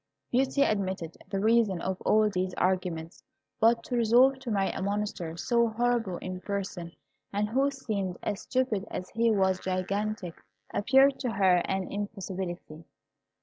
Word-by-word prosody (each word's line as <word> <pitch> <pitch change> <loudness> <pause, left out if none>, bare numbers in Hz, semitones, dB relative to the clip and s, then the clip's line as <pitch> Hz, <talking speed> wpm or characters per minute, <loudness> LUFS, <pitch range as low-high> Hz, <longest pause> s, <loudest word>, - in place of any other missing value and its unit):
Beauty 270 +3 +2
admitted 190 - -1
the 195 - -1
reason 215 -3 +3
of 185 +1 -3
all 215 0 +4
these 185 -2 -2
arguments; 180 -3 -1 0.4
but 230 0 +4
to 245 - -3
resolve 245 +4 +5
to 260 -2 -7
marry 195 -3 +1
a - - -5
monster 200 -4 -2
so 235 +4 +2
horrible 230 -4 0
in 185 +1 -6
person 190 -4 -4 0.4
and 205 +1 -1
who 270 +5 +2
seemed 205 -9 -3
as 205 -1 -2
stupid 240 -6 -1
as 180 - -6
he 230 +1 +2
was 190 -3 +2
gigantic, 190 0 -2 0.4
appeared 270 +5 +4
to 250 - -1
her 190 -3 +4
an 190 -1 -2
impossibility. 190 -5 -5
200 Hz, 150 wpm, -28 LUFS, 185-230 Hz, 0.4 s, resolve